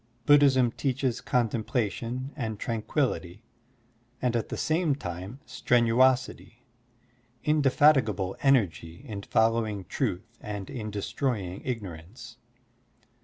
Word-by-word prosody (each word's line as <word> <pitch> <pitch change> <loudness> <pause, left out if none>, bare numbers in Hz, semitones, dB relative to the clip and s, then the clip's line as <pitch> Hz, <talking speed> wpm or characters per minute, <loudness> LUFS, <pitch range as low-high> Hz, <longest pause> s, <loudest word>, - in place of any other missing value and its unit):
Buddhism 135 -4 +5
teaches 130 -2 -1
contemplation 120 +2 -1
and 110 -7 -4
tran 115 -3 -2
quillity 105 - -2 0.8
and 125 -2 0
at 115 - -1
the - - -4
same 155 -2 +1
time 95 +2 -7
strenuosity, 125 0 +1 0.8
inde 150 -1 +2
fatigable 125 -9 +3
energy 95 - +1
in 100 -3 -5
following 110 -2 +1
truth 110 +7 -3
and 105 -2 -6
in 110 -3 -5
destroying 105 -2 -3
ignorance. 100 -4 -7
115 Hz, 100 wpm, -27 LUFS, 100-130 Hz, 0.8 s, Buddhism